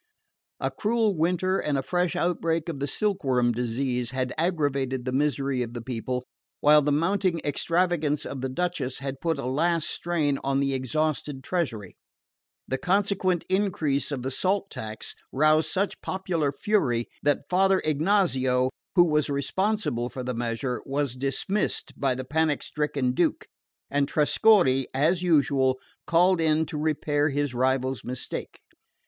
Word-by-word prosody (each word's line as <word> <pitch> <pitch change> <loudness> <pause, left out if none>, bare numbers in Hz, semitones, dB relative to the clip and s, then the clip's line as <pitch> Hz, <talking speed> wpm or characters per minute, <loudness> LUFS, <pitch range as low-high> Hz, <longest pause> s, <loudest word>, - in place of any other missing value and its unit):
A - - -1
cruel 220 -2 +1
winter 180 +3 +1
and 145 -2 0
a 135 - -1
fresh 180 +4 0
outbreak 165 -2 0
of 150 -5 -4
the 140 - -1
silkworm 135 - +1
disease 125 +1 -1
had 130 0 -2
aggravated 140 -6 0
the 130 - -1
misery 135 -1 0
of 120 0 -4
the 120 - -4
people, 125 +1 -3 0.3
while 150 +1 +6
the 145 +1 +1
mounting 170 +3 +1
extravagance 160 0 0
of 135 -2 -5
the 130 - -2
Duchess 140 -4 -2
had 135 -1 -6
put 165 -3 0
a 140 - -4
last 160 +5 +1
strain 155 -5 0
on 135 0 +1
the 140 0 +1
exhausted 145 +1 -2
treasury. 120 - -3 0.7
The 130 - -2
consequent 185 -2 +1
increase 180 -8 0
of 130 -4 -3
the 135 - -2
salt 195 +7 0
tax 110 0 -6 0.2
roused 155 +3 +3
such 195 +1 -1
popular 175 -6 -1
fury 135 - 0
that 145 -1 +1
Father 190 +1 +3
Ignazio, 140 -6 +2 0.2
who 175 - +8
was 150 -2 +1
responsible 140 - 0
for 130 - -6
the 125 0 -2
measure, 120 +2 -2
was 140 -2 -1
dismissed 135 +10 -2
by 135 -2 0
the 130 0 -5
panic 155 +1 0
stricken 145 -4 -1
Duke, 125 - 0 0.5
and 140 0 +2
Trescorre, 150 - +4
as 165 +6 +2
usual, 140 -6 +3 0.3
called 175 +1 +4
in 160 0 +2
to 150 - -6
repair 150 -1 +1
his 145 -1 -1
rival's 130 -1 0
mistake. 125 0 -6
145 Hz, 150 wpm, -26 LUFS, 130-175 Hz, 0.7 s, who